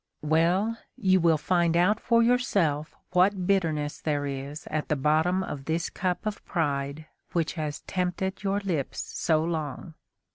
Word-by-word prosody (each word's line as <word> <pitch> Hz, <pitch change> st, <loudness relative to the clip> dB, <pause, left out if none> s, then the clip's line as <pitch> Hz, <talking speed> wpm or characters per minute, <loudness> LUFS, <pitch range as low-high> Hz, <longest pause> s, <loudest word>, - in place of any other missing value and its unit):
Well! 175 Hz, +9 st, +2 dB, 0.2 s
you 190 Hz, -2 st, +3 dB
will 165 Hz, -2 st, +4 dB
find 170 Hz, +1 st, +2 dB
out 205 Hz, +5 st, +3 dB
for 230 Hz, -1 st, +3 dB
yourself 195 Hz, -, +1 dB, 0.2 s
what 185 Hz, +1 st, +3 dB
bitterness 160 Hz, -6 st, 0 dB
there 145 Hz, -2 st, 0 dB
is 140 Hz, +3 st, -5 dB
at 155 Hz, 0 st, -1 dB
the 150 Hz, -, +1 dB
bottom 160 Hz, +6 st, +2 dB
of 145 Hz, -6 st, -6 dB
this 165 Hz, +2 st, -1 dB
cup 180 Hz, +1 st, -2 dB
of 215 Hz, -1 st, -3 dB
pride 145 Hz, -2 st, -2 dB, 0.3 s
which 165 Hz, -2 st, 0 dB
has 150 Hz, -3 st, -4 dB
tempted 185 Hz, +1 st, -2 dB
your 200 Hz, +1 st, 0 dB
lips 170 Hz, -9 st, -2 dB
so 155 Hz, -1 st, 0 dB
long. 160 Hz, 0 st, -4 dB
170 Hz, 150 wpm, -27 LUFS, 150-190 Hz, 0.3 s, will